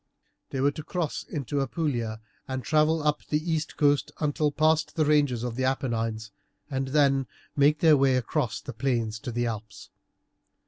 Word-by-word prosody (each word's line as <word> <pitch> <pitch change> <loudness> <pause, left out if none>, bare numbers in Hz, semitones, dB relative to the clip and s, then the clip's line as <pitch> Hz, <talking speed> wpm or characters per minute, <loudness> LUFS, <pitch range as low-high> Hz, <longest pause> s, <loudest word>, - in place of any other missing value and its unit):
They 135 - -4
were 140 +1 +3
to 155 - -8
cross 170 -2 -2
into 145 -1 -3
Apulia, 120 -6 -2 0.3
to 130 - -2
travel 155 +4 +2
up 150 0 +1
the 150 - +1
east 160 0 -2
coast 145 -2 +2
until 150 0 +1
past 155 +2 +2
the 155 - +2
ranges 145 -6 +2
of 120 -2 -3
the 130 - -1
Apennines, 115 -5 -1 0.4
and 135 0 -1
then 135 -2 +3 0.3
make 145 +1 +3
their 160 -2 +7
way 135 -2 +3
across 125 -1 -1
the 140 - -7
plains 115 -2 -1
to 120 - -5
the 120 +1 -1
Alps. 110 -2 -6
140 Hz, 170 wpm, -27 LUFS, 120-150 Hz, 0.4 s, their